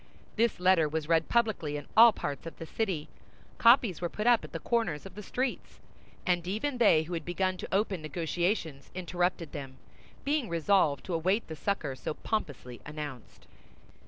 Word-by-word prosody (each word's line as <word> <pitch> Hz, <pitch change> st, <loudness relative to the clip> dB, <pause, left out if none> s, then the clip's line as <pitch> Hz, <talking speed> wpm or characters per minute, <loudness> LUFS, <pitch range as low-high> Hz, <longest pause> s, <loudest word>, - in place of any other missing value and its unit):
This 230 Hz, -2 st, +1 dB
letter 180 Hz, -4 st, +4 dB
was 155 Hz, 0 st, -3 dB
read 165 Hz, -1 st, +2 dB
publicly 215 Hz, -11 st, +1 dB
in 145 Hz, -, -7 dB
all 230 Hz, +1 st, +9 dB
parts 145 Hz, -6 st, -5 dB
of 165 Hz, -, -9 dB
the 165 Hz, -, -7 dB
city. 180 Hz, -5 st, -2 dB, 0.5 s
Copies 230 Hz, -, +5 dB
were 175 Hz, -, -1 dB
put 210 Hz, -, -4 dB
up 240 Hz, -1 st, +5 dB
at -, -, -9 dB
the -, -, -4 dB
corners 195 Hz, -11 st, -1 dB
of 195 Hz, -, -9 dB
the 210 Hz, -, -8 dB
streets; 250 Hz, +5 st, -3 dB, 0.5 s
and 175 Hz, -1 st, +1 dB
even 240 Hz, +7 st, -2 dB
they 160 Hz, -9 st, +5 dB
who 170 Hz, +3 st, -7 dB
had 165 Hz, -2 st, -3 dB
begun 185 Hz, +2 st, -1 dB
to -, -, -7 dB
open 195 Hz, -3 st, 0 dB
negotiations 160 Hz, 0 st, -2 dB
interrupted 175 Hz, -2 st, -1 dB
them, 135 Hz, -4 st, -7 dB, 0.5 s
being 285 Hz, -4 st, 0 dB
resolved 165 Hz, -4 st, +2 dB
to 185 Hz, -, -4 dB
await 185 Hz, +7 st, +1 dB
the 160 Hz, -, -6 dB
succor 155 Hz, -5 st, -2 dB
so 140 Hz, -, -5 dB
pompously 145 Hz, -, -4 dB
announced. 150 Hz, -5 st, -8 dB
175 Hz, 175 wpm, -30 LUFS, 155-210 Hz, 0.5 s, all